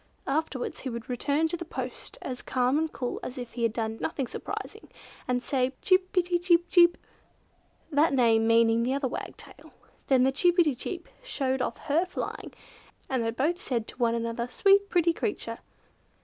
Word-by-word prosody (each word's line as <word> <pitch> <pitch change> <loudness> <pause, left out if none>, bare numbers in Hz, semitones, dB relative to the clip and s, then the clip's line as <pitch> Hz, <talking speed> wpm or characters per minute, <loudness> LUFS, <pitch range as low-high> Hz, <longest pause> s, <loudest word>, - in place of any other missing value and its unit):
Afterwards 285 -2 -2
he 265 - -4
would 235 0 -6
return 285 +6 +1
to 345 - -2
his 340 -1 -7
post 255 -5 -6
as 250 -1 -5
calm 255 +3 +1
and 320 -1 -1
cool 245 -2 -4
as 255 - -7
if 245 -2 -7
he 240 - -5
had 230 -1 +2
done 220 0 -3
nothing 280 -4 -2
surprising - - -7 0.4
and 250 0 0
say 255 -2 +1
"Pretty 370 -1 +5
pretty 355 -2 +1
Chip 345 -1 +4
pi 345 - -36
ti - - -32 0.2
chip!" 345 - -17 0.9
that 295 +3 +4
name 230 -4 +3
meaning 230 0 +4
the 255 +3 0
other 280 -1 0
wagtail. 250 - -8 0.4
Then 260 -2 +4
Chip 350 +5 +2
pi 350 - +7
ti 300 -3 +1
chip 345 +8 -6
showed 270 - -1
off - - -2
her 320 +5 +2
flying, - - -5 0.6
and 255 -3 +1
they 225 - 0
both 295 +10 -1
said 235 -4 -2
to - - -12
one 235 -2 +2
another 230 +1 -2
"Sweet 400 +8 +4
pretty 340 -2 +3
creature!" 410 +4 -3
265 Hz, 190 wpm, -28 LUFS, 240-335 Hz, 0.9 s, pi